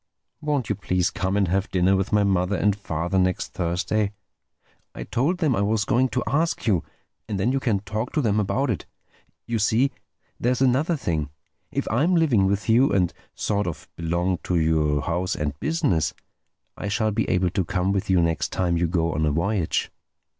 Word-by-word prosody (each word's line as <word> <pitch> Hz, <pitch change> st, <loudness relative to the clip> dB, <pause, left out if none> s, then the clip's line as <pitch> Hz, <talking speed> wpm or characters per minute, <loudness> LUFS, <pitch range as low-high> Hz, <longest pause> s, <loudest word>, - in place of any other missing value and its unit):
Won't 145 Hz, -6 st, -1 dB
you -, -, +1 dB
please 90 Hz, -3 st, 0 dB
come 95 Hz, +2 st, -1 dB
and 100 Hz, -2 st, +2 dB
have 95 Hz, +2 st, 0 dB
dinner 95 Hz, +1 st, +3 dB
with 95 Hz, +1 st, -1 dB
my 105 Hz, -1 st, +4 dB
mother 95 Hz, 0 st, +1 dB
and 100 Hz, +3 st, +2 dB
father 85 Hz, -1 st, -2 dB
next 90 Hz, -1 st, 0 dB
Thursday—I 100 Hz, +4 st, -4 dB
told 150 Hz, +10 st, 0 dB
them 155 Hz, -8 st, +1 dB
I 100 Hz, -, 0 dB
was 105 Hz, 0 st, +1 dB
going 130 Hz, +4 st, +2 dB
to 120 Hz, +2 st, -1 dB
ask 160 Hz, +4 st, 0 dB
you—and 100 Hz, +1 st, -3 dB
then 110 Hz, +6 st, +2 dB
you 135 Hz, -, +1 dB
can 110 Hz, -7 st, 0 dB
talk 110 Hz, +4 st, -3 dB
to 155 Hz, -, +2 dB
them 105 Hz, -4 st, +1 dB
about 125 Hz, +6 st, 0 dB
it. 95 Hz, -, -4 dB, 0.6 s
You 115 Hz, -1 st, -1 dB
see, 115 Hz, +6 st, +2 dB, 0.5 s
there's 125 Hz, +1 st, +1 dB
another 135 Hz, +6 st, +2 dB
thing: 80 Hz, -, -2 dB, 0.4 s
if -, -, -2 dB
I'm 155 Hz, +11 st, +2 dB
living 130 Hz, -, +3 dB
with 100 Hz, +1 st, -1 dB
you, 120 Hz, +5 st, +4 dB
and 90 Hz, -3 st, +2 dB, 0.2 s
sort 105 Hz, -2 st, -1 dB
of 85 Hz, -, -6 dB
belong 85 Hz, +2 st, -1 dB
to 90 Hz, -, -2 dB
your 75 Hz, -3 st, +2 dB
house 90 Hz, +3 st, -1 dB
and 75 Hz, -1 st, -3 dB
business, 120 Hz, -, 0 dB, 0.6 s
I -, -, -5 dB
shall 110 Hz, +2 st, +1 dB
be 110 Hz, +2 st, -1 dB
able 90 Hz, -1 st, +2 dB
to 95 Hz, -, 0 dB
come 90 Hz, +2 st, 0 dB
with 100 Hz, -1 st, -1 dB
you 95 Hz, -2 st, +4 dB
next 80 Hz, -1 st, 0 dB
time 90 Hz, -2 st, 0 dB
you 85 Hz, 0 st, +1 dB
go 85 Hz, -1 st, 0 dB
on 80 Hz, -, -1 dB
a -, -, +2 dB
voyage." 85 Hz, +3 st, 0 dB
100 Hz, 190 wpm, -24 LUFS, 90-115 Hz, 0.6 s, my